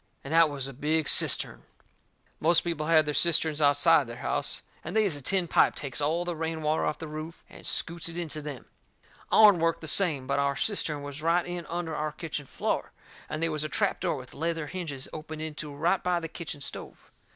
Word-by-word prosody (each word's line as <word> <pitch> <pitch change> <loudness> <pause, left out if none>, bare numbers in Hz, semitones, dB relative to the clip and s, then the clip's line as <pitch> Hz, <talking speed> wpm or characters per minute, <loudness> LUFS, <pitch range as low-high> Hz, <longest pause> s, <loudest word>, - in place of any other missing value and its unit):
And 140 - -5
that 165 -1 +6
was 140 -2 -3
a 135 - -8
big 150 +4 0
cistern. - - +4 0.8
Most 170 +2 +4
people 165 -3 -3
has 160 -2 +5
their 150 - -2
cisterns 160 -1 +3
outside 145 0 +4
their 120 - -7
house, - - -2 0.2
and - - -6
they 220 -1 +4
is 185 -7 +2
a 145 - -7
tin 185 +5 +1
pipe - - +3
takes 140 0 -4
all 165 +4 0
the 175 -1 -3
rain 160 0 -3
water 155 +1 +1
off - - -2
the 160 - -7
roof 155 +2 -7
and - - -9
scoots 170 0 -1
it 165 - -8
into 160 -3 -4
them. 145 -4 -7 0.7
Ourn 210 -5 +7
worked 165 0 +1
the 160 - -6
same, 155 -6 +1
but 140 +1 0
our 140 0 +1
cistern 150 -6 -1
was 145 +1 -7
right 170 +2 +2
in 175 -1 -5
under 170 -2 -3
our 155 0 -2
kitchen 155 -4 -5
floor, - - -2 0.4
and 155 +2 -3
they 165 - +3
was 155 -1 -1
a 155 - -3
trap 200 +4 +1
door 180 - 0
with 130 -1 -10
leather 165 0 -2
hinges 150 -5 -6
opened 155 0 -6
into 150 -1 -6
it - - -10
right 170 +6 +1
by 180 -1 +1
the 165 - -5
kitchen 155 -3 -7
stove. 140 - -6
155 Hz, 220 wpm, -28 LUFS, 145-170 Hz, 0.8 s, Ourn